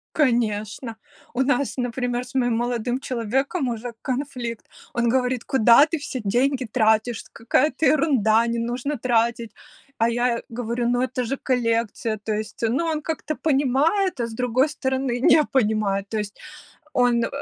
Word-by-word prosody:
Конечно. 230 -4 0 0.4
У 250 - 0
нас, 275 0 0
например, 245 0 -2
с 255 - -14
моим 245 -3 +2
молодым 240 +1 -1
человеком 265 - -1
уже 235 +1 -5
конфликт. 250 -4 -4 0.3
Он 235 0 +1
говорит: 250 0 +1
"Куда 240 +2 +6
ты 325 +1 -3
все 275 -2 -5
деньги 255 +5 +1
тратишь? 220 0 +1
Какая-то 260 +6 +1
ерунда, 255 -7 +3
не 235 0 -1
нужно 245 +5 -2
тратить!" 235 -1 0 0.5
А 230 +1 +2
я 240 0 0
говорю: 235 0 -2
"Ну 245 0 +1
это 255 0 -1
же 270 +4 -2
коллекция". 230 -3 -1
То 215 +1 -4
есть, 215 +2 -5
ну, 265 +9 0
он 315 -2 -1
как-то 310 -1 -3
понимает, 295 +6 +1
а 235 - 0
с 230 - -9
другой 250 +4 +1
стороны 265 -3 -2
не 300 +4 +5
понимает. 210 -6 0
То 220 - -2
есть 210 -1 -5 0.5
он, 245 -3 +3
э, - - -1
245 Hz, 155 wpm, -23 LUFS, 230-265 Hz, 0.5 s, Куда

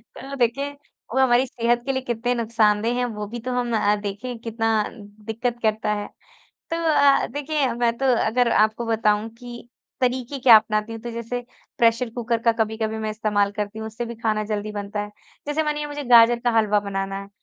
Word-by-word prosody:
तो 275 +1 -7
देखिए, 275 +3 0
वो 280 -3 -7
हमारी 255 0 +4
सेहत 240 -1 0
के 270 - 0
लिए 260 0 -2
कितने 245 0 -1
नुकसानदेह 225 0 +1
हैं 250 - +1
वो 210 -1 -5
भी 240 +3 -6
तो 250 +2 -5
हम 240 -2 0
अ, 210 -1 +3
देखें 210 +4 -5
कितना 225 -1 0
दिक्क़त 225 +3 -5
करता 215 -1 0
है? 205 0 -4 0.6
तो 330 - -1
अ, 295 -4 +4
देखिए 290 -2 -1
मैं 235 -1 0
तो 270 - -2 0.2
अगर 240 +2 +2
आपको 215 +2 +2
बताऊँ 220 -1 +1
की 240 -1 -10 0.3
तरीके 255 +2 -1
क्या 245 -3 +8
अपनाती 215 0 -1
हूँ? 225 - -6
तो 240 - -6
जैसे 235 +1 -4 0.4
प्रेशर 230 +1 +3
कुकर 235 0 -1
का 230 - +4
कभी-कभी 220 0 -2
मैं 215 0 -3
इस्तेमाल 210 -2 0
करती 210 +1 -4
हूँ, 220 - -5
उससे 230 +2 -5
भी 235 0 -7
खाना 215 -2 -1
जल्दी 210 0 -3
बनता 205 0 -5
है। 210 0 -7 0.4
जैसे 305 +2 0
मानिए 300 0 -2
मुझे 290 0 -5
गाजर 235 -1 +6
का 240 0 +1
हलवा 210 -1 +3
बनाना 195 -1 -4
है, 200 - -11
230 Hz, 195 wpm, -23 LUFS, 215-245 Hz, 0.6 s, क्या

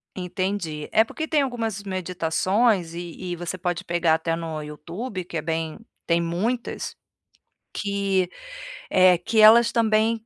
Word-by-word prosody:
Entendi, 180 -4 -3
é 220 - +5
porque 315 +7 -5
tem 305 -2 +2
algumas 225 -6 -3
meditações, 185 +1 0
e 175 +1 -6
e - - -2
você 175 +2 -5
pode 175 -2 -2
pegar 170 -2 +2
até 165 0 -1
no 165 -2 -5
YouTube, 170 - -6
que 170 -1 -6
é - - -1
bem, 160 +1 -3 0.3
tem 170 0 +3
muitas, 195 +9 -2 0.8
que, 200 -2 0 0.6
eh, 185 -1 +6
que 220 +5 0
elas 225 +2 +8
também 225 0 +2
185 Hz, 140 wpm, -24 LUFS, 170-215 Hz, 0.8 s, elas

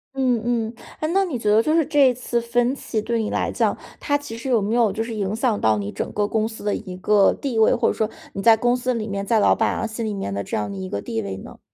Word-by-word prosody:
嗯 255 -4 +1
嗯。 230 -1 -1 0.3
诶？ 310 - 0
那 390 +1 +4
你 330 -10 -3
觉 215 -2 -1
得 215 +2 +5
就 305 +7 +1
是 330 -2 +3
这 290 -2 +4
一 - - 0
次 240 -1 -2
分 240 +2 +1
歧 230 -5 -3
对 230 +1 -1
你 215 - -2
来 - - -1
讲， - - 0 0.2
它 285 - +1
其 285 -5 -8
实 250 +3 -5
有 240 -3 +4
没 205 +3 -1
有 235 -4 +3
就 220 +3 -2
是 230 0 -6
影 205 -1 -2
响 230 -2 0
到 110 -1 +3
你 100 0 -4
整 - - -4
个 205 0 0
公 220 0 0
司 220 -1 -9
的 205 -1 0
一 185 -3 -7
个 200 +1 +4
地 255 -5 -2
位， 220 - +5
或 235 - +1
者 - - +2
说 215 -1 -1 0.2
你 195 - -4
在 225 +2 +6
公 245 +2 +2
司 255 0 -1
里 220 -2 -3
面， 200 -1 -3
在 220 +2 +3
老 - - +5
板 - - +1
啊 - - -2
心 225 +1 -4
里 215 - -2
面 195 - -4
的 100 0 -2
这 - - -3
样 105 -1 -2
的 - - -6
一 95 -1 -5
个 100 +1 -3
地 110 +1 -3
位 95 -2 -5
呢？ - - -11
225 Hz, 325 characters per minute, -22 LUFS, 200-245 Hz, 0.3 s, 在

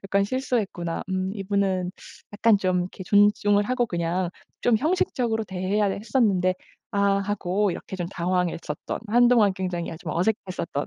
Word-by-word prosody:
약간 195 +1 +2
'실수했구나. 205 -8 -2
음 185 0 -1
이분은 195 -2 0 0.4
약간 210 0 +4
좀 185 -2 +1
이렇게 180 +2 -6
존중을 205 +1 +4
하고 245 +1 0
그냥 175 0 -1 0.3
좀 240 -2 +3
형식적으로 245 -6 0
대해야 190 +2 0
했었는데 200 -3 +1 0.4
아.' 200 -1 +3
하고 200 0 0
이렇게 190 - -7
좀 175 - -3
당황했었던 175 -4 -2
한동안 240 -3 +5
굉장히 180 -3 -3
아 165 - -7
좀 165 -3 -6
어색했었던 180 -5 -1
195 Hz, 345 characters per minute, -25 LUFS, 180-210 Hz, 0.4 s, 한동안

